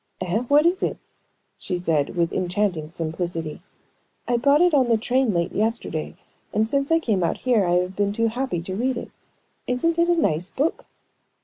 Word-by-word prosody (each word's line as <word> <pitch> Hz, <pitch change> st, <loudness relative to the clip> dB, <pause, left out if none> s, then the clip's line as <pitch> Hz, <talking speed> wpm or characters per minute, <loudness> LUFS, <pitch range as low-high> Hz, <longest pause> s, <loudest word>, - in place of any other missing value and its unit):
"Eh? 185 Hz, +3 st, 0 dB
What 290 Hz, +3 st, +5 dB
kind 340 Hz, -, +5 dB
is 380 Hz, -, -15 dB
it?" -, -, -1 dB, 0.6 s
she 180 Hz, -, -3 dB
said, 160 Hz, -4 st, 0 dB
with 170 Hz, -1 st, 0 dB
enchanting 180 Hz, -3 st, -1 dB
simplicity. 165 Hz, 0 st, -4 dB, 0.7 s
"I 245 Hz, -, +2 dB
bought 280 Hz, +5 st, +4 dB
it 355 Hz, -2 st, +4 dB
on 260 Hz, -4 st, +3 dB
the 230 Hz, -, +4 dB
train 250 Hz, +2 st, +1 dB
late 170 Hz, -2 st, 0 dB
yesterday, 215 Hz, -7 st, -2 dB, 0.4 s
and 215 Hz, +1 st, +1 dB
since 275 Hz, +4 st, 0 dB
I 325 Hz, -, +6 dB
came 215 Hz, -, 0 dB
out 165 Hz, -, 0 dB
here 240 Hz, -5 st, +2 dB
I 175 Hz, -, +1 dB
have 180 Hz, +1 st, 0 dB
been 200 Hz, 0 st, +1 dB
too 230 Hz, +2 st, +1 dB
happy 240 Hz, -7 st, -3 dB
to 185 Hz, +1 st, -4 dB
read 250 Hz, +4 st, 0 dB
it. -, -, -7 dB, 0.6 s
Isn't 325 Hz, +7 st, 0 dB
it 340 Hz, +1 st, +3 dB
a 345 Hz, -, +4 dB
nice 180 Hz, -, 0 dB
book?" 295 Hz, +5 st, -2 dB
215 Hz, 195 wpm, -23 LUFS, 175-265 Hz, 0.7 s, I